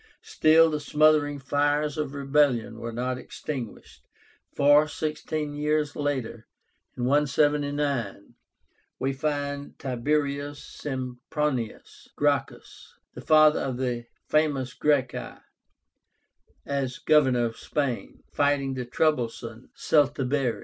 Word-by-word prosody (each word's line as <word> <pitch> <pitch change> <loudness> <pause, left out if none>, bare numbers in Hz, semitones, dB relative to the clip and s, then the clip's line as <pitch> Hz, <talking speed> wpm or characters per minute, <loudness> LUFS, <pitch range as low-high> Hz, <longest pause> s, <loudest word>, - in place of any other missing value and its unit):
Still 160 +1 +4
the 150 - -1
smouldering 150 0 +3
fires 145 +2 0
of 150 -2 -3
rebellion 135 -5 +1
were 115 0 -5
not 125 +2 -3
extinguished, 130 -6 -7 0.5
for, 145 +2 +5
sixteen 150 0 -3
years 150 0 0
later 130 -6 -3 0.5
(179), 145 -4 0 0.6
we 135 +1 -1
find 145 0 -3
TIBERIUS 140 +2 -1
SEMPRONIUS 130 -1 -4
GRACCHUS, - - -2 0.2
the - - -9
father 155 -1 +5
of 130 -2 -3
the 125 -2 -2 0.2
famous 140 -4 +1
Gracchi, 140 -4 -1 1.3
as 135 -2 -2
Governor 130 -6 +3
of 115 -1 -4
Spain, 140 -5 -3
fighting 145 -2 +1
the 125 -1 -4
troublesome 120 -4 -1
Celtibéri. 140 -3 +1
145 Hz, 95 wpm, -26 LUFS, 125-150 Hz, 1.3 s, for